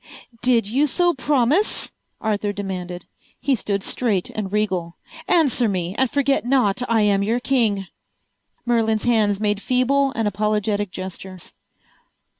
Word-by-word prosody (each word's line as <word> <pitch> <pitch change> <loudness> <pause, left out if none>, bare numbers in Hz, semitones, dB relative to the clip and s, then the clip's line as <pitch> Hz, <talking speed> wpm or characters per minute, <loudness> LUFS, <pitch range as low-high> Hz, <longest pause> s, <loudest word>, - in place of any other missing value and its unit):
"Did 240 -3 +3
you 270 +8 +2
so 350 +4 +2
promise?" 290 - +1 0.3
Arthur 210 -1 -1
demanded. 180 -3 -5 0.3
He 275 +1 +1
stood 200 -5 -2
straight 210 -8 0
and 205 -3 -4
regal. 190 -5 -1 0.3
"Answer 265 -8 +3
me, 180 -2 -2
and 265 +1 +2
forget 280 0 +1
not 245 -4 +2
I 225 -2 +3
am 200 -1 +3
your 225 +4 0
king." 225 -7 +1 0.8
Merlin's 225 -3 +1
hands 215 -4 +2
made 210 -1 0
feeble 270 +3 +2
and 225 -2 0
apologetic 210 0 0
gestures. 185 0 -8
215 Hz, 130 wpm, -22 LUFS, 200-255 Hz, 0.8 s, Did